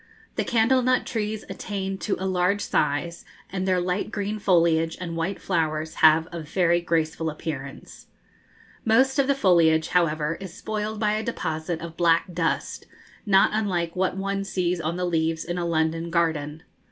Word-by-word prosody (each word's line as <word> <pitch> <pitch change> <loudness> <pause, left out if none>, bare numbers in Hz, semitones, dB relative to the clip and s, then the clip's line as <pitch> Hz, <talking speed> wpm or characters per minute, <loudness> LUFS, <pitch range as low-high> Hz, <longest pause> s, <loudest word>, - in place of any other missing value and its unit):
The - - 0
candle 240 +3 +3
nut 255 0 +2
trees 215 -2 -3
attain 195 -1 -4
to 210 - -1
a 190 - -4
large 185 +2 +1
size, 150 +3 -1 0.3
and 190 0 -2
their 185 -1 +3
light 180 +3 -1
green 210 +1 -3
foliage 165 -4 +2
and 170 -2 -5
white 165 +4 -2
flowers 155 -3 -1
have 160 +1 +6
a 170 - -5
very 175 +2 +1
graceful 160 -1 -1
appearance. 150 -3 -7 0.8
Most 265 +5 +3
of 275 - +3
the 280 - +3
foliage, 165 -8 +3
however, 165 -3 +1
is 190 -2 -8
spoiled 215 0 -4
by 210 -1 +2
a 215 +1 -1
deposit 160 -7 -3
of 165 -1 -8
black 170 +1 +2
dust, 165 -5 -2 0.4
not 195 -1 +5
unlike 180 -6 -1
what 185 0 0
one 195 0 -2
sees 180 -2 -1
on 160 +2 -2
the 180 - -1
leaves 165 -2 0
in 175 +1 -3
a 175 - -1
London 165 0 0
garden. 160 -2 -1
175 Hz, 165 wpm, -25 LUFS, 160-195 Hz, 0.8 s, have